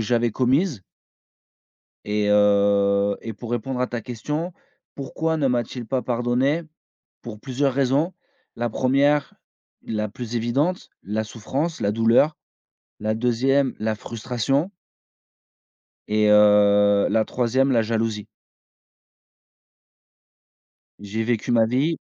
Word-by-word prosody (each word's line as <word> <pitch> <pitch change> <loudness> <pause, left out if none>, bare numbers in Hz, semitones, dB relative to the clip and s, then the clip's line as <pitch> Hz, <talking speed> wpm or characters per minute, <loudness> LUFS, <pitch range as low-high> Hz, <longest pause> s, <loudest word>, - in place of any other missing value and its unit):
j'avais 115 +1 +1
commises 130 - 0 1.2
et 105 0 -1
heu 100 -1 +3
et 115 - -5
pour 115 +3 -9
répondre 125 +1 -3
à 125 - +1
ta 120 -2 -5
question, 150 +8 -4 0.4
pourquoi 160 +4 -2
ne 140 - +1
m'a-t-il 120 -1 -2
pas 130 +2 -1
pardonné? 125 +6 0 0.6
Pour 110 -3 -9
plusieurs 135 +2 -1
raisons. 140 +6 +1 0.4
La 120 0 -1
1ère, 140 +4 +1 0.5
la 105 -1 -3
plus 120 +2 -6
évidente, 135 +10 -1
la 105 +3 -3
souffrance, 135 +9 -4
la 100 - +1
douleur. 115 +7 +3 0.6
La 110 +1 -1
2ème, 130 +3 +1
la 110 0 -1
frustration 125 - -2 1.4
et 105 0 +2
heu, 105 -1 +5
la 110 -1 +2
3ème 130 +4 +1
la 115 -2 +3
jalousie. 110 -2 -2 2.7
J'ai 105 +2 -3
vécu 120 0 -1
ma 115 -1 +4
vie 135 +8 0
120 Hz, 110 wpm, -23 LUFS, 105-135 Hz, 2.7 s, heu